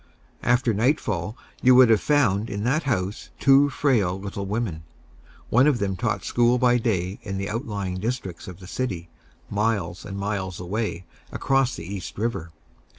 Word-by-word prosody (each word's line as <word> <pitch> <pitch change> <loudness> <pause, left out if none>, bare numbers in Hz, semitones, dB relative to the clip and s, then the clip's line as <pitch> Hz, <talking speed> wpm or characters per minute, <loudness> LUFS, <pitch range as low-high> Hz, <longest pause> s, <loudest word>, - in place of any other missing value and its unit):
After 120 -1 +2
nightfall 105 - 0 0.2
you 130 0 +6
would 125 -2 +7
have 110 - +4
found 115 -8 +2
in 100 +1 -3
that 140 +6 +1
house 100 -3 -2
two 140 +1 +5
frail 115 -10 +1
little 100 0 -5
women. 100 -6 -2 0.7
One 125 +5 +5
of 145 -4 +3
them 100 -3 -1
taught - - -2
school 120 +1 +3
by 125 -1 +3
day 95 -5 -1
in 95 -4 -5
the 100 0 -3
outlying 100 -6 -3
districts 105 -5 -4
of 90 -1 -9
the 95 - -11
city, 90 -5 -4 0.4
miles 100 -5 -1
and 95 0 -6
miles 95 -2 -3
away, 90 0 -3 0.3
across 135 -2 +1
the 80 - -8
East 95 -1 -6
River. 105 -6 -2
105 Hz, 160 wpm, -24 LUFS, 95-125 Hz, 0.7 s, would